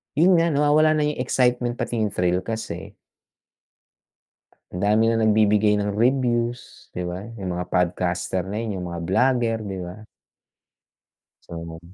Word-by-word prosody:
yun 175 +3 +5
nga 170 - +3
nawawala 155 +1 +3
na 150 - +1
yung 145 - -9
excitement 125 -1 +1
pati 120 -1 -3
yung 110 - +1
thrill 90 0 +1
kasi 110 +3 -6 1.8
Ang 90 - -5
dami 105 +3 +3
ng 115 - +1
nagbibigay 105 -1 +3
ng 105 0 -1
reviews, 120 +1 -1
'di 90 - -3
ba? 90 +4 -5
Yung 95 -4 -4
mga 90 - -3
podcaster 90 +1 -1
na 100 - -5
yun 100 -4 -4
yung 90 - -5
mga 85 - -5
blogger, 120 +4 +2
'di 100 -3 -5
ba? 90 +5 -9 1.4
So. 85 -1 -7
110 Hz, 145 wpm, -23 LUFS, 90-125 Hz, 1.8 s, yun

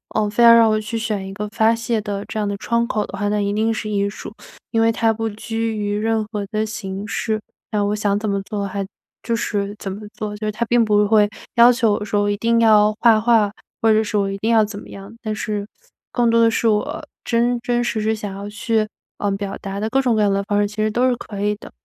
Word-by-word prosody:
呃， 215 -1 +1
非 225 +3 +2
要 235 0 +9
让 230 -1 +6
我 215 - +2
去 220 +2 -4
选 215 -4 -2
一 195 - -7
个 210 +1 -4
发 220 +1 +3
泄 230 -1 -1
的 205 -1 -4
这 220 - -5
样 210 - 0
的 200 0 -2
窗 235 +2 0
口 210 -1 -1
的 - - -8
话， 205 +1 -1
那 210 0 0
一 200 0 0
定 220 +2 +1
是 215 -1 -4
艺 200 -1 0
术。 210 - -9 0.4
因 225 - +2
为 225 - +4
它 225 0 +2
不 225 0 -2
拘 225 +1 -3
于 205 0 -1
任 220 0 0
何 205 -2 -3
的 215 0 0
形 205 -2 -5
式， 220 -1 -1 0.3
那 210 -1 +1
我 205 +1 0
想 205 -1 0
怎 215 - -2
么 200 0 0
做， 200 0 -3
还 195 0 -3 0.4
就 230 0 -1
是 205 -2 -2
怎 195 - -5
么 200 +3 -7
做。 210 -1 -5
就 215 0 -4
是 - - 0
它 235 +3 -2
并 240 0 +3
不 210 -1 +3
会 210 -1 +4 0.3
要 235 +1 +8
求 235 -4 +2
我 210 - -2
说， 205 0 0
我 205 - +1
一 205 - +1
定 230 +1 +2
要 215 -1 +5
画 225 -2 +5
画， 225 -3 +3 0.3
或 225 - +4
者 215 +1 +3
是 210 0 -2
我 200 -1 +1
一 195 - -4
定 220 +3 -1
要 220 -2 +5
怎 205 -1 -7
么 - - -13
样， 200 +2 -10
但 215 -2 -3
是 205 -1 -3 0.4
更 240 -2 +2
多 230 0 +4
的 230 - +5
是 230 - +1
我 210 -1 0 0.2
真 240 +1 +1
真 240 0 0
实 225 -2 -1
是 220 +1 +1
想 205 -2 -6
要 200 +1 -6
去， 215 0 0 0.3
呃， 205 - 0
表 195 0 -3
达 195 0 -5
的 215 - -1
各 270 +3 +2
种 245 -4 +2
各 215 - +2
样 205 -1 +3
的 200 - 0
方 205 +1 0
式， 205 - +1
其 205 - -11
实 215 0 +1
都 245 +4 +2
是 250 - +2
可 205 -4 -7
以 210 0 +1
的。 - - -13
215 Hz, 290 characters per minute, -20 LUFS, 205-225 Hz, 0.4 s, 要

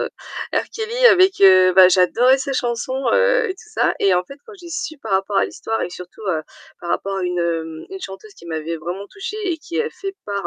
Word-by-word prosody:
Heu, - - -1 0.5
R - - -1
Kelly 465 +3 +2
avec 380 -3 +5
heu, 185 -1 +7
bah, 185 -1 +8
j'adorais 235 +9 +4
ses 270 +1 -3
chansons, 255 +2 -2
heu, - - +3
et - - -3
tout 390 +3 -17
ça. - - +1
Et 195 - +3
en 180 - +1
fait, 275 - -12
quand 445 - -12
j'ai 345 - -11
su 335 -3 -5
par 225 -6 -6
rapport 195 +1 0
à - - +3
l'histoire, 225 0 -4
et - - -2
que 180 - -10
surtout, 180 +4 -11
heu, 160 -4 0 0.4
par 170 - -5
rapport 195 0 -2
à - - -3
une, 180 0 -2
hem 165 -2 -3
une 385 0 -7
chanteuse 195 - -9
qui - - -16
m'avait 160 0 -4
vraiment 175 +5 -6
touchée 405 +1 -7 0.2
et - - -3
qui 335 +2 -6
avait 460 0 -2
fait 390 -2 -7
part, 200 -1 -3
205 Hz, 245 wpm, -20 LUFS, -, 0.5 s, bah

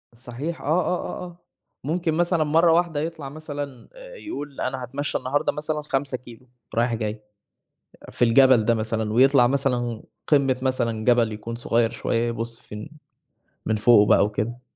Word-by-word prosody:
صحيح، 130 +7 -6
آه - - -10
آه 180 +2 0
آه - - -6
آه، 175 -1 -12 0.5
ممكن 165 +2 -1
مثلًا 170 0 +1
مرّة 165 +3 +4
واحدة 170 -3 +1
يطلع 155 -3 -5
مثلًا 145 -4 -7
آآ - - -12
يقول 145 - -7
أنا 130 0 -3
هاتمشى 135 +4 -3
النهارده 130 +3 0
مثلًا 150 0 -3
5 135 -2 -2
كيلو 120 0 -15 0.3
رايح 120 +1 +1
جاي، 110 -1 -4 0.8
أ - - -11
في 120 - +2
الجبل 120 -1 +5
ده 115 - +3
مثلًا 110 -1 -2
ويطلع 130 +1 +5
مثلًا 125 -4 -1 0.2
قمة 135 -4 +3
مثلًا 115 -4 -1
جبل 120 -3 +3
يكون 110 +2 -6
صغيّر 115 -1 +1
شويّة 115 0 -1
يبُص 115 0 -4
في - - -11
إن 105 +5 -8 0.8
من 110 - +1
فوقه 105 0 +5
بقى - - +5
وكده. 105 +4 -3
130 Hz, 165 wpm, -24 LUFS, 115-150 Hz, 0.8 s, الجبل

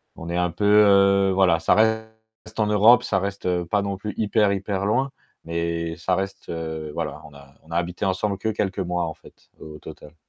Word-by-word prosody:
on 85 +1 -8
est 85 - -2
un 90 -1 0
peu, 100 +5 -3
heu, 100 -2 +5
voilà, 95 -3 +3
ça 80 - +2
reste 110 0 +1 0.5
en 105 - +2
Europe, 110 +4 +6
ça 95 - 0
reste, 100 -1 -4
heu, 90 -1 0
pas 100 +4 0
non 100 -1 -3
plus 105 +2 -6
hyper 105 -1 +2
hyper 100 0 -3
loin, 130 +6 0 0.3
mais 85 0 -3
ça 90 +2 0
reste, 95 +1 -5
heu, 80 -2 -5
voilà, 75 - -4
on 75 - -14
a 70 -1 -16
on 80 - -18
a 85 - -1
habité 90 +3 -3
ensemble 95 +1 -1
que 110 +2 -2
quelques 100 -2 -2
mois, 90 -1 -1
en 80 - -5
fait, - - -20
au 75 -1 -10
total. 75 +2 -12
95 Hz, 215 wpm, -23 LUFS, 85-105 Hz, 0.5 s, Europe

